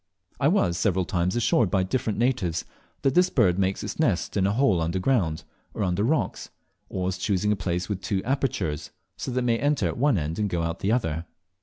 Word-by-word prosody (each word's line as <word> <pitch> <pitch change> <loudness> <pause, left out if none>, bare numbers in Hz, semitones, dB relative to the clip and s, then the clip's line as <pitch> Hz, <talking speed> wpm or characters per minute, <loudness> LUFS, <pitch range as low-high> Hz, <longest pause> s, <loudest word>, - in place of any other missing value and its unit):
I - - +3
was 85 -1 +2
several 95 0 +1
times 90 0 0
assured 120 -3 +2
by 95 -1 +2
different 110 +2 -1
natives 115 -9 0 0.4
that 135 -2 +3
this 180 +3 +4
bird 100 - +3
makes 95 0 0
its - - -5
nest 105 - +1
in 95 -2 +2
a - - +1
hole 105 -6 +2
under 85 +3 -1
ground, 90 -7 +1 0.3
or - - -1
under 90 +1 0
rocks, 140 +3 0 0.4
always 95 0 -2
choosing 100 +2 +1
a - - +3
place 90 -2 -2
with 100 -3 -3
two 95 0 -1
apertures, 125 - -1 0.3
so - - -5
that 125 0 0
it - - -1
may 115 -1 +1
enter 145 +2 +1
at - - -4
one 140 -4 +3
and 85 +7 -1
go 85 -2 -1
out 85 +1 -2
at - - -29
the 100 - 0
other. 80 -9 -1
95 Hz, 215 wpm, -26 LUFS, 90-120 Hz, 0.4 s, this